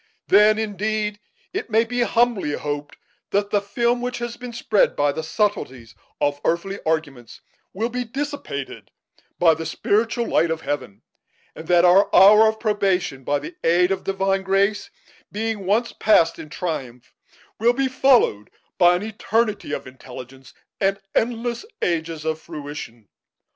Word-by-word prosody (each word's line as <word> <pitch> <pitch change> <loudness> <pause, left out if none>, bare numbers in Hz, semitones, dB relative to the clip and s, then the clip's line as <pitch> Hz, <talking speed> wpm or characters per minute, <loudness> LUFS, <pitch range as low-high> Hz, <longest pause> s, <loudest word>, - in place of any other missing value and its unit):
Then, 210 +2 +6
indeed, 210 0 -2 0.3
it 405 - -4
may 220 +1 +3
be 245 +1 -2
humbly 235 -9 +1
hoped 145 0 -5 0.3
that 200 0 0
the 205 - +2
film 235 +4 0
which 250 0 -3
has 240 0 -5
been 250 -1 -8
spread 220 -3 +1
by 145 0 +2
the 160 - -4
subtleties 155 - -2 0.3
of 145 -1 0
earthly 195 +4 -1
arguments 145 -7 -3 0.3
will 225 +5 -2
be 250 +1 -3
dissipated 265 - -6 0.5
by 165 -2 +5
the 160 +1 -5
spiritual 230 +7 0
light 170 - +2
of 160 0 -2
Heaven; 135 -9 -5 0.5
and 160 - -10
that 175 0 +5
our 185 +3 +5
hour 210 +4 +8
of 220 0 -1
probation, 195 - 0
by 145 +3 0
the 145 - -8
aid 180 +2 +3
of 190 0 -2
divine 195 0 0
grace, 195 +2 0 0.4
being 215 -2 -3
once 225 +4 +1
passed 170 -6 +3
in 155 - -9
triumph, 135 -9 -5 0.5
will 235 +2 +4
be 270 +1 0
followed 255 - +3 0.3
by 175 -1 +6
an 180 - -3
eternity 215 -3 -1
of - - -4
intelligence 130 0 -12 0.2
and 195 0 +1
endless 235 - -1 0.2
ages 165 -2 -2
of 160 0 -2
fruition. 140 -7 -8
195 Hz, 150 wpm, -22 LUFS, 155-220 Hz, 0.5 s, hour